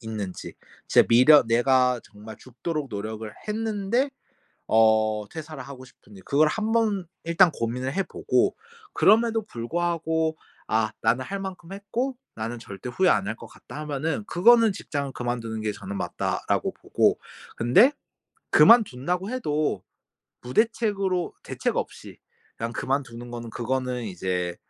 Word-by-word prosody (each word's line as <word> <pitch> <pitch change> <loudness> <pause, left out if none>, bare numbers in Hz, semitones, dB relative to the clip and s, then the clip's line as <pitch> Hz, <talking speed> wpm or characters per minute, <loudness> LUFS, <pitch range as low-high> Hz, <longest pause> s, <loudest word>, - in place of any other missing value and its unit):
있는지, 105 -5 -6 0.3
진짜 - - +6
미련 130 +5 +7
내가 125 +1 +3
정말 105 +1 -12
죽도록 145 +4 -5
노력을 110 +1 -5 0.2
했는데 220 +4 0 0.6
어 110 -1 +3
퇴사를 155 -3 -8
하고 130 0 -10
싶은지 105 -5 -17
그걸 150 +2 +3
한번 215 -2 0 0.2
일단 170 +2 +5
고민을 125 +4 -3
해 195 - +1
보고 - - 0 0.4
그럼에도 225 +1 +4
불구하고 160 - -1 0.3
'아 110 0 +1
나는 120 +3 +2
할 200 0 -5
만큼 190 -2 -7
했고 235 +7 -3 0.2
나는 115 +2 -4
절대 100 +1 -9
후회 185 +8 +2
안 100 -2 +2
할 110 - -3
것 - - -11
같다.' 150 - -11
하면은 150 +5 -2
그거는 225 +4 +5
'직장을 140 -7 -4
그만두는 120 -3 -4
게 105 -1 -1
저는 100 0 -7
맞다.'라고 - - -2
보고 - - +1 0.4
근데 185 - +5 0.6
그만둔다고 180 - +4
해도 155 - -1 0.6
무대책으로 195 - 0
대책 - - -2
없이 - - -5 0.4
그냥 115 +1 -4
그만두는 120 -3 -3
거는 120 -1 -6
그거는 125 +1 -2
이제 90 -3 -3
135 Hz, 295 characters per minute, -25 LUFS, 115-190 Hz, 0.6 s, 미련